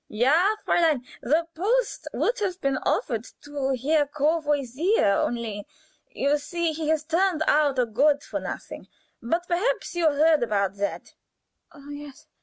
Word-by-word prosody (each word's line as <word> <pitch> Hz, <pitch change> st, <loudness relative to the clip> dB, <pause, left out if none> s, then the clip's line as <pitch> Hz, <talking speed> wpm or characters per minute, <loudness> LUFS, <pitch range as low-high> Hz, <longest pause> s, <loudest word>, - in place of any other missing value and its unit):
"Ja, 310 Hz, -, +3 dB
Fräulein, 310 Hz, -7 st, +2 dB, 0.2 s
the 310 Hz, +7 st, +1 dB
post 460 Hz, +9 st, -1 dB
would -, -, 0 dB
have 375 Hz, -3 st, -2 dB
been 275 Hz, -4 st, 0 dB
offered 230 Hz, -3 st, -1 dB, 0.2 s
to 280 Hz, -2 st, -2 dB
Herr 295 Hz, +3 st, +2 dB
Courvoisier, 295 Hz, -, +1 dB
only, 225 Hz, -4 st, -3 dB, 0.5 s
you 285 Hz, +2 st, 0 dB
see, 340 Hz, +3 st, -2 dB
he 310 Hz, 0 st, -4 dB
has 315 Hz, -1 st, +1 dB
turned 335 Hz, +1 st, +1 dB
out 290 Hz, -2 st, +3 dB
a 250 Hz, -, +3 dB
good 280 Hz, +6 st, +2 dB
for -, -, -4 dB
nothing. -, -, -7 dB, 0.3 s
But 335 Hz, +10 st, -1 dB
perhaps 425 Hz, +9 st, -1 dB
you 345 Hz, -2 st, +2 dB
heard 305 Hz, +2 st, +3 dB
about 200 Hz, -4 st, 0 dB
that?" 200 Hz, 0 st, -4 dB
300 Hz, 135 wpm, -25 LUFS, 265-340 Hz, 0.5 s, Ja